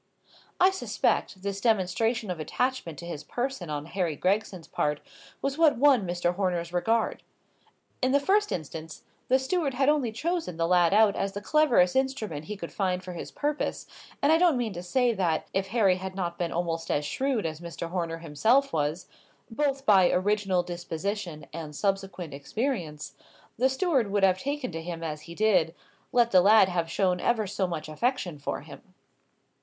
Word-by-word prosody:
I 370 +1 +6
suspect, 195 - -1
this 200 0 -3
demonstration 220 0 +1
of 175 - -5
attachment 245 - -2
to 170 - -8
his 170 -4 -6
person 245 - -3
on 150 -1 -3
Harry 170 -2 -2
Gregson's 185 0 -1
part 150 0 -1 0.4
was 275 +2 -1
what 305 -6 +5
won 260 -7 +4
Mr. 175 0 0
Horner's 175 -2 -1
regard. 220 +6 +1 0.8
In 255 - +2
the 280 - +4
first 410 +8 +2
instance, 160 -1 -6 0.2
the 260 - +4
steward 275 +1 -1
had 270 +2 +3
only 285 -6 +2
chosen 320 - -2
the 165 - +1
lad 175 -1 +4
out 210 0 +5
as 195 0 -2
the 205 - -4
cleverest 235 -8 +3
instrument 230 - -1
he 210 +3 -6
could 170 -3 -7
find 185 -2 -1
for 180 -1 -7
his 170 - -6
purpose; 295 0 -2 0.4
and 285 - +5
I 320 - +5
don't 345 -6 +4
mean 230 -4 -2
to 175 - -6
say 240 +7 +1
that, 175 -6 0
if 195 0 0
Harry 200 -6 +3
had 190 0 -6
not 175 -3 -3
been 175 -2 -1
almost 165 -1 -2
as 145 - 0
shrewd 255 - -1
as 160 0 -4
Mr. 170 0 -6
Horner 170 -3 -2
himself 220 - +2
was, 155 +3 -1 0.5
both 275 +2 -1
by 190 -4 +6
original 195 -1 +1
disposition 175 -1 -4
and 155 -2 -7
subsequent 195 -4 -2
experience, 150 - -3 0.4
the 260 +3 +2
steward 265 - +1
would 200 0 0
have 185 -1 +4
taken 280 -2 -3
to 165 0 -5
him 165 0 -6
as 155 0 -6
he 170 - -8
did, 185 -6 +2 0.4
let 235 -1 +3
the 185 - +7
lad 205 0 +6
have 170 -2 -1
shown 180 +1 +1
ever 225 0 +1
so 195 -1 -1
much 160 -3 -5
affection 175 - -2
for 140 - -3
him. - - -14
190 Hz, 180 wpm, -27 LUFS, 170-245 Hz, 0.8 s, the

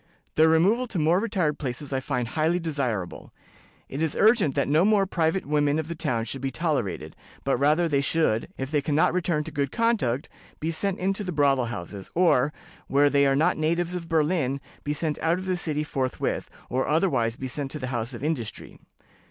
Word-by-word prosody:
Their 160 +1 +5
removal 200 +10 +3
to 215 - -5
more 165 +3 +3
retired 180 -9 0
places 140 +1 -4
I 135 - +1
find 125 -3 -2
highly 160 +5 +1
desirable. 135 - -3 0.6
It 140 - -5
is 160 -2 0
urgent 215 - +4
that 140 - +1
no 155 +4 +4
more 205 -1 +4
private 170 0 0
women 145 0 +2
of 160 -1 -2
the 170 - -3
town 130 -9 -1
should 135 +2 -5
be 135 - -1
tolerated, 120 - -2 0.3
but 135 - +1
rather 150 +5 +3
that 170 - +1
they 140 -1 +3
should, 140 -6 +1
if 135 +1 -4
they 150 -2 +2
can 145 +1 -1
not 160 - +3
return 170 -4 0
to 160 - -8
good 140 -2 -1
conduct, 215 - +1 0.3
be 160 +2 -1
sent 190 +3 -1
into 195 +2 -1
the 185 - -3
brothel 140 -5 +2
houses, 100 -3 -7
or, 150 -6 +4 0.4
where 145 +1 +3
they 140 0 +4
are 135 - +3
not 150 +4 +2
natives 170 +3 0
of 170 -2 -5
Berlin, 155 -4 +1 0.2
be 145 - -2
sent 150 0 -2
out 165 +2 +1
of 185 - -6
the 185 -1 0
city 155 -4 -1
forthwith, 135 -4 -2 0.2
or 130 +2 -1
otherwise 135 -9 +1
be 130 +1 -5
sent 135 +1 -3
to 150 - -4
the 130 -2 -5
House 120 +1 -2
of 120 - -8
Industry. 145 -8 -4
150 Hz, 210 wpm, -26 LUFS, 135-170 Hz, 0.6 s, Their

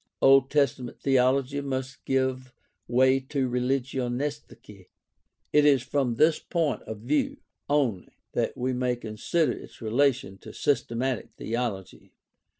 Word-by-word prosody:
Old 135 0 +6
Testament 135 -4 0
theology 135 +1 +2
must 130 -1 -4
give 130 -1 -1 0.3
way 130 +2 +4
to 135 0 -2
Religionsgeschichte. 125 -4 -3 0.7
It 150 - +6
is 140 -4 +4
from 130 -3 0
this 155 +6 +4
point 165 -4 -1
of 110 -2 -6
view 140 +6 0 0.3
only 130 -11 0 0.2
that - - -1
we 130 +1 -1
may 125 0 0
consider 120 +8 -1
its - - -9
relation 115 -4 0
to - - -11
systematic 130 -2 -1
theology. 115 -5 -4
130 Hz, 120 wpm, -27 LUFS, 120-140 Hz, 0.7 s, Old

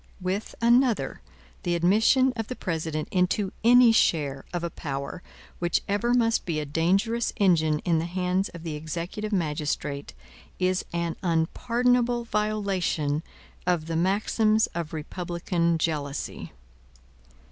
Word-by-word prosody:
With 190 +3 -3
another, 235 - +3 0.4
the 175 - 0
admission 220 +9 +4
of 225 -2 -3
the 255 - -5
President 160 -5 -3
into 185 +1 +1
any 245 0 +7
share 145 -10 +1
of 175 -1 -3
a 170 - -2
power 140 +3 -5 0.4
which 175 -1 0
ever 220 +5 +1
must 230 -2 +2
be 165 -3 -2
a 150 - -3
dangerous 195 +10 +1
engine 165 -7 +3
in 170 -3 +2
the 165 - -2
hands 180 +2 0
of 170 -1 -10
the 165 -2 -4
executive 170 +7 -5
magistrate, 150 -5 -2 0.4
is 185 0 +1
an 170 -1 -2
unpardonable 240 +8 +1
violation 200 -9 -1 0.5
of 175 -3 +1
the 165 0 -3
maxims 215 +5 +2
of 170 -3 -4
republican 170 +1 -1
jealousy. 150 -3 -3
180 Hz, 125 wpm, -26 LUFS, 160-215 Hz, 0.5 s, any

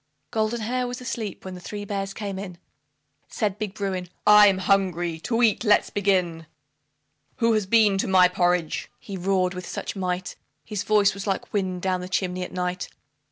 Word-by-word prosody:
Goldenhair 235 +2 -1
was 245 0 -5
asleep 230 -7 -5
when 190 - -6
the 180 - -8
three 205 +3 -6
bears 195 -1 -3
came 200 -2 -5
in. 185 -3 -7 0.7
Said 210 -2 -2
Big 210 -2 -4
Bruin, 190 -4 -3 0.2
"I'm 210 -2 +7
hungry 180 -4 +1
to 230 +7 0
eat, 225 -1 +3
let's 210 -3 +3
begin 180 -5 0 0.9
WHO 230 -1 +2
HAS 215 -2 +1
BEEN 210 -2 +4
TO - - 0
MY 185 -1 +6
PORRIDGE?" 175 -2 0
he 200 - -8
roared 185 0 +1
with 180 0 -7
such - - -5
might; 185 -1 -3 0.3
His 210 -3 -3
voice 205 -1 +3
was 200 +1 -7
like 195 - -2
wind 185 -3 -1
down 185 -1 0
the 180 - -7
chimney 185 -1 -1
at 180 - -5
night. 180 0 -3
195 Hz, 175 wpm, -25 LUFS, 180-210 Hz, 0.9 s, I'm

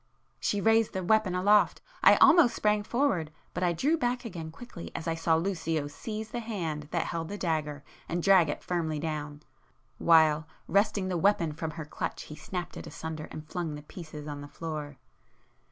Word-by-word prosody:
She 205 - 0
raised 225 +1 +3
the 190 -1 -2
weapon 215 -1 +2
aloft,—I 210 - +4
almost 325 -7 +6
sprang 210 0 +2
forward—but 180 - -2
I 180 -1 +3
drew 295 - +1
back 245 -2 -1
again 170 -8 -6
quickly 170 0 -9
as 165 - -4
I 165 - +1
saw 165 0 +2
Lucio 165 -3 -1
seize 215 +9 -6
the 240 - -3
hand 170 -10 -4
that 170 0 -1
held 165 -1 -3
the 205 - -4
dagger 150 -5 -2 0.3
and 170 0 -1
drag 190 -5 +6
it - - -4
firmly 165 -3 -1
down,—while, 150 +1 0 0.2
wresting 200 -1 +2
the 180 -2 -1
weapon 180 -4 +3
from 160 +1 -4
her 160 - -5
clutch 150 - -4
he 150 - -9
snapped 175 +2 -5
it - - -8
asunder 160 -1 -6
and 155 0 -8
flung 165 -3 -3
the 150 - -9
pieces 155 -2 -9
on 145 -1 -5
the 145 - -8
floor. 150 -2 -6
165 Hz, 175 wpm, -29 LUFS, 155-205 Hz, 0.3 s, almost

